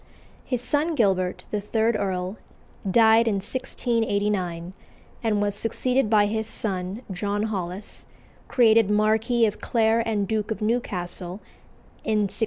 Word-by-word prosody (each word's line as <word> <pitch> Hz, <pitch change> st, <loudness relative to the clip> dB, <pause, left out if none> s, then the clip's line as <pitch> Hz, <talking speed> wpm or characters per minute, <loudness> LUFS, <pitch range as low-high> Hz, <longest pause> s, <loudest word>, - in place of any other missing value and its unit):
His 250 Hz, -3 st, -2 dB
son 300 Hz, +5 st, 0 dB
Gilbert, 185 Hz, -6 st, +1 dB
the 210 Hz, -, -1 dB
third 220 Hz, +2 st, +1 dB
Earl, 190 Hz, 0 st, -2 dB, 0.5 s
died 225 Hz, +2 st, +5 dB
in 215 Hz, -, +2 dB
1689, 200 Hz, -6 st, -1 dB, 0.5 s
and 215 Hz, -3 st, +1 dB
was 205 Hz, -1 st, 0 dB
succeeded 250 Hz, +3 st, 0 dB
by 210 Hz, -2 st, +5 dB
his 220 Hz, +1 st, -2 dB
son, 195 Hz, +1 st, -3 dB
John 200 Hz, +3 st, -1 dB
Holles, 195 Hz, -2 st, -5 dB, 0.4 s
created 225 Hz, -4 st, +4 dB
Marquis 220 Hz, +3 st, +3 dB
of 210 Hz, -1 st, -2 dB
Clare 225 Hz, -1 st, +2 dB
and 215 Hz, -3 st, 0 dB
Duke 220 Hz, -1 st, -1 dB
of 220 Hz, -, -3 dB
Newcastle 190 Hz, -6 st, -2 dB, 0.7 s
in 215 Hz, -1 st, +1 dB
1694. -, -, -15 dB
215 Hz, 130 wpm, -25 LUFS, 195-230 Hz, 0.7 s, died